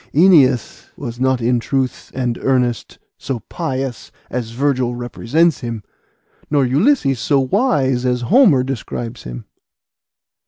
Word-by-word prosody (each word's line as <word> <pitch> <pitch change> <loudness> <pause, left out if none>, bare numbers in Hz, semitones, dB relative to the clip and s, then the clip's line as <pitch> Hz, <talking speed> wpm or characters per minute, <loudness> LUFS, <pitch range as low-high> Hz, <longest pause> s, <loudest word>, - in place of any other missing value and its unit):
Æneas 150 - +4
was 120 0 -7
not 130 -1 +1
in 120 +1 +2
truth 130 +1 -2
and 125 -3 -2
earnest 125 -3 0 0.2
so 135 -4 -4
pious 135 -6 -4 0.2
as 120 -2 -3
Virgil 125 0 0
represents 130 +6 0
him, 115 -3 -5 0.7
nor 145 -3 +2
Ulysses 140 - +2
so 135 +4 +2
wise 135 - +1
as 125 -1 0
Homer 180 - +4
describes 120 -2 -5
him." - - -7
130 Hz, 120 wpm, -18 LUFS, 120-140 Hz, 0.7 s, Æneas